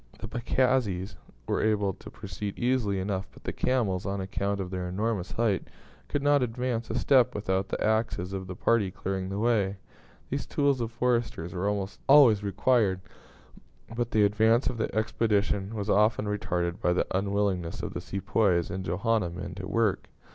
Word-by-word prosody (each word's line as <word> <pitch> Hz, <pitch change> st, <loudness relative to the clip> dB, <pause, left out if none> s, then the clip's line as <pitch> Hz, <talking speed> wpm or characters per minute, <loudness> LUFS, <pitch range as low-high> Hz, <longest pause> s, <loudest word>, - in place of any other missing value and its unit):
The 105 Hz, -, -7 dB
pagazis 115 Hz, -5 st, 0 dB, 0.3 s
were -, -, 0 dB
able 105 Hz, -3 st, +1 dB
to -, -, -12 dB
proceed 100 Hz, 0 st, -6 dB
easily 120 Hz, -6 st, +1 dB
enough; 95 Hz, 0 st, -2 dB
but -, -, -17 dB
the -, -, -3 dB
camels, 105 Hz, -8 st, 0 dB
on 100 Hz, 0 st, -2 dB
account 100 Hz, +1 st, -2 dB
of 95 Hz, -1 st, -4 dB
their 90 Hz, -1 st, -3 dB
enormous 100 Hz, 0 st, -2 dB
height, 110 Hz, -4 st, 0 dB, 0.4 s
could 145 Hz, -, -2 dB
not 145 Hz, -1 st, +4 dB
advance 120 Hz, -1 st, -2 dB
a 115 Hz, -, -2 dB
step 125 Hz, -1 st, +4 dB
without 95 Hz, -2 st, -1 dB
the -, -, -2 dB
axes 110 Hz, -4 st, 0 dB
of 95 Hz, -1 st, -4 dB
the 90 Hz, -, -6 dB
party 110 Hz, 0 st, +2 dB
clearing 95 Hz, -1 st, -4 dB
the 100 Hz, -, -3 dB
way. 105 Hz, -3 st, +1 dB, 0.5 s
These -, -, -2 dB
tools 140 Hz, -3 st, +1 dB
of 115 Hz, -1 st, -2 dB
foresters 115 Hz, -8 st, -1 dB
were 95 Hz, +2 st, 0 dB
almost 100 Hz, 0 st, -3 dB
always 130 Hz, -8 st, +7 dB
required; 100 Hz, -1 st, +2 dB, 0.9 s
but 120 Hz, -1 st, -1 dB
the 110 Hz, -2 st, +3 dB
advance 110 Hz, +4 st, +3 dB
of 120 Hz, -, -8 dB
the 110 Hz, -, 0 dB
expedition 110 Hz, -2 st, 0 dB
was 105 Hz, -1 st, -3 dB
often 105 Hz, +1 st, +3 dB
retarded 90 Hz, -2 st, -2 dB
by 90 Hz, -, +2 dB
the 90 Hz, -, +1 dB
unwillingness 100 Hz, -3 st, -1 dB
of -, -, -4 dB
the -, -, -4 dB
Sepoys 95 Hz, -3 st, 0 dB
and 95 Hz, -1 st, -4 dB
Johanna 100 Hz, +3 st, 0 dB
men 90 Hz, +1 st, -6 dB
to 95 Hz, 0 st, -6 dB
work. 105 Hz, -1 st, 0 dB
105 Hz, 175 wpm, -28 LUFS, 95-115 Hz, 0.9 s, always